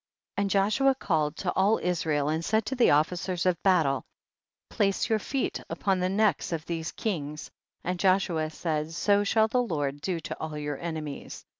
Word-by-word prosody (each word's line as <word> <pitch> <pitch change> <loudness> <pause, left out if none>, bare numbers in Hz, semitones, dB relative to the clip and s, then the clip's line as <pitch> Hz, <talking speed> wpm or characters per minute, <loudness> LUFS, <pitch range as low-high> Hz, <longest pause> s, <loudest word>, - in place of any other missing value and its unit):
27. 200 - +2
And 200 - -1
Joshua 215 +8 +3
called 155 - 0
to 180 - -1
all 200 +4 +3
Israel 160 -5 0
and 160 +2 0
said 220 +4 +1
to 265 - -2
the 245 - +4
officers 175 +4 +1
of 180 -2 +1
battle, 160 -8 +3 0.7
place 195 -1 +1
your 220 -1 +2
feet 265 +4 -2
upon 190 -2 0
the 180 0 +1
necks 210 0 +1
of 160 -2 -3
these 165 -1 -3
kings, 150 -8 -4 0.3
and 180 0 -2
Joshua 185 -5 +2
said, 155 0 -3
so 205 +4 +3
shall 220 +2 +3
the 250 +3 +1
Lord 145 - -2
do 180 -1 -2
to 165 - -5
all 155 -1 -4
your 145 -2 -4
enemies. 155 -4 -6
180 Hz, 180 wpm, -28 LUFS, 155-200 Hz, 0.7 s, the